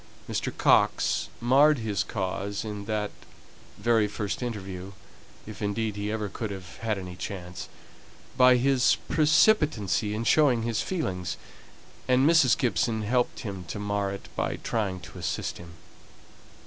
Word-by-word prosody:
Mr. -, -, -2 dB
Coxe -, -, +3 dB
marred 140 Hz, +5 st, +5 dB
his 110 Hz, -4 st, -1 dB
cause 100 Hz, +1 st, -3 dB
in 105 Hz, -1 st, -5 dB
that 105 Hz, -1 st, -2 dB, 0.7 s
very 115 Hz, -3 st, +2 dB
first 105 Hz, +1 st, -4 dB
interview, 100 Hz, -5 st, -5 dB, 0.5 s
if 110 Hz, -1 st, -9 dB
indeed 105 Hz, +1 st, -1 dB
he 105 Hz, +1 st, -3 dB
ever 110 Hz, -1 st, -2 dB
could 110 Hz, +2 st, -5 dB
have 95 Hz, -3 st, -8 dB
had 110 Hz, -2 st, -2 dB
any 90 Hz, -2 st, -7 dB
chance, 90 Hz, -1 st, -7 dB, 0.7 s
by 125 Hz, -1 st, +6 dB
his 130 Hz, 0 st, +3 dB
precipitancy 150 Hz, -, +3 dB
in 110 Hz, -, -2 dB
showing 130 Hz, -3 st, +4 dB
his 115 Hz, -2 st, -1 dB
feelings, 95 Hz, -, -3 dB, 0.7 s
and 130 Hz, +2 st, +4 dB
Mrs. 160 Hz, -7 st, +5 dB
Gibson 110 Hz, 0 st, 0 dB
helped 120 Hz, +3 st, 0 dB
him 100 Hz, -4 st, -6 dB
to 95 Hz, -, -6 dB
mar 100 Hz, -1 st, -1 dB
it 100 Hz, -, -8 dB
by -, -, -1 dB
trying 100 Hz, -5 st, -2 dB
to -, -, -11 dB
assist -, -, -3 dB
him. 85 Hz, -1 st, -11 dB
105 Hz, 140 wpm, -27 LUFS, 100-125 Hz, 0.7 s, by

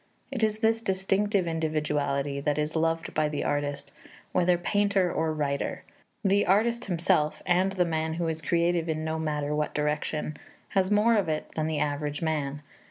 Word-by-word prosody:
It 255 Hz, -4 st, -3 dB
is 215 Hz, 0 st, +1 dB
this 225 Hz, 0 st, +3 dB
distinctive 195 Hz, 0 st, +1 dB
individuality 150 Hz, -4 st, -1 dB
that 145 Hz, +1 st, 0 dB
is 150 Hz, +1 st, -1 dB
loved 165 Hz, 0 st, 0 dB
by 155 Hz, -1 st, +1 dB
the 150 Hz, -, -2 dB
artist, 145 Hz, -1 st, -2 dB, 0.4 s
whether 180 Hz, -1 st, +3 dB
painter 200 Hz, 0 st, +1 dB
or 160 Hz, 0 st, 0 dB
writer. 145 Hz, -2 st, -2 dB, 0.4 s
The 200 Hz, +1 st, +4 dB
artist 235 Hz, +5 st, +2 dB
himself, 165 Hz, -4 st, +1 dB
and 185 Hz, +2 st, +2 dB
the 180 Hz, -2 st, +2 dB
man 160 Hz, -1 st, -1 dB
who 170 Hz, 0 st, -1 dB
is 160 Hz, 0 st, -2 dB
creative 170 Hz, +1 st, +1 dB
in 155 Hz, 0 st, -1 dB
no 160 Hz, 0 st, -2 dB
matter 150 Hz, -2 st, -1 dB
what 150 Hz, 0 st, -1 dB
direction, 150 Hz, 0 st, -1 dB, 0.3 s
has 190 Hz, -1 st, +1 dB
more 210 Hz, +3 st, +4 dB
of 200 Hz, -5 st, +1 dB
it 155 Hz, -1 st, -2 dB
than 155 Hz, -1 st, -1 dB
the 160 Hz, -1 st, -1 dB
average 145 Hz, +1 st, -1 dB
man. 150 Hz, -2 st, -2 dB
160 Hz, 170 wpm, -28 LUFS, 150-190 Hz, 0.4 s, The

